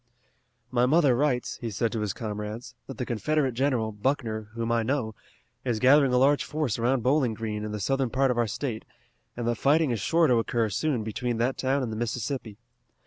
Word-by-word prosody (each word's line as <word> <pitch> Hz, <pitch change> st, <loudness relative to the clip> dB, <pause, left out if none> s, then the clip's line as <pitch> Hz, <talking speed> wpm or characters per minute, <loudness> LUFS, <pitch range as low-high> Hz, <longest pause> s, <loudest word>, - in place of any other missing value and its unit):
"My 125 Hz, 0 st, +3 dB
mother 145 Hz, -3 st, +4 dB
writes," 130 Hz, -2 st, 0 dB
he 115 Hz, -, -3 dB
said 110 Hz, +2 st, -1 dB
to 115 Hz, -, -2 dB
his 105 Hz, -2 st, -1 dB
comrades, 105 Hz, +2 st, -6 dB
"that 135 Hz, -, -8 dB
the 125 Hz, -, -2 dB
Confederate 135 Hz, +4 st, 0 dB
general, 125 Hz, -3 st, 0 dB
Buckner, 110 Hz, -1 st, -2 dB
whom 115 Hz, 0 st, -2 dB
I 115 Hz, 0 st, +2 dB
know, 115 Hz, -2 st, -1 dB, 0.5 s
is 120 Hz, -3 st, 0 dB
gathering 135 Hz, +3 st, +5 dB
a 125 Hz, -, +3 dB
large 140 Hz, +3 st, +4 dB
force 150 Hz, -8 st, -2 dB
around 120 Hz, +1 st, +1 dB
Bowling 130 Hz, -3 st, +2 dB
Green 105 Hz, -1 st, -4 dB
in 105 Hz, -, -4 dB
the 105 Hz, -, -4 dB
southern 135 Hz, +5 st, 0 dB
part 135 Hz, +2 st, +2 dB
of 120 Hz, -, -2 dB
our 120 Hz, -, +2 dB
state, 110 Hz, +1 st, -4 dB, 0.5 s
and 120 Hz, -1 st, -2 dB
that 120 Hz, -1 st, 0 dB
fighting 150 Hz, 0 st, +3 dB
is 115 Hz, -, -1 dB
sure 165 Hz, -, +3 dB
to 125 Hz, -5 st, +4 dB
occur 115 Hz, -1 st, 0 dB
soon 135 Hz, -2 st, 0 dB
between 115 Hz, +2 st, -2 dB
that 120 Hz, +3 st, 0 dB
town 135 Hz, +1 st, +1 dB
and 115 Hz, -, -3 dB
the -, -, -4 dB
Mississippi. 115 Hz, -1 st, -3 dB
120 Hz, 205 wpm, -27 LUFS, 110-135 Hz, 0.5 s, gathering